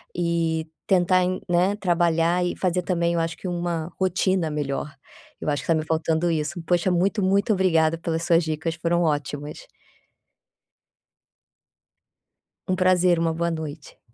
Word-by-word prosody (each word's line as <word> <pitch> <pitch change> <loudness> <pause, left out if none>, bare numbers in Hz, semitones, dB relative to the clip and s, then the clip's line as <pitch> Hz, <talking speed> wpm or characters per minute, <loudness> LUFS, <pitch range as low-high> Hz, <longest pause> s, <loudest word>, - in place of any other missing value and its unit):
e 165 -2 0 0.2
tentar 185 -1 +3
em 185 +1 -2
né, 180 +3 +2
trabalhar 175 -1 +1
e 175 - -2
fazer 180 -1 0
também, 170 -2 0
eu 170 - +1
acho 165 0 -2
que 185 - -7
uma 175 -1 -3
rotina 185 -2 +1
melhor, 145 0 -3 0.5
eu - - -2
acho 145 - -1
que - - -12
tá 165 - +3
me 155 0 -2
faltando 160 +1 0
isso. 160 +1 -2
Poxa, 175 +2 +1
muito, 190 +4 +1
muito 200 +3 +2
obrigada 165 -4 +2
pelas 165 -1 -3
suas 170 0 +3
dicas, 160 +1 -3
foram 170 +1 0
ótimas. 150 - -3 3.0
Um 185 - +1
prazer, 185 -1 +3
uma 165 -1 +1
boa 170 +1 -1
noite. 155 -2 -7
170 Hz, 150 wpm, -24 LUFS, 160-180 Hz, 3.0 s, tentar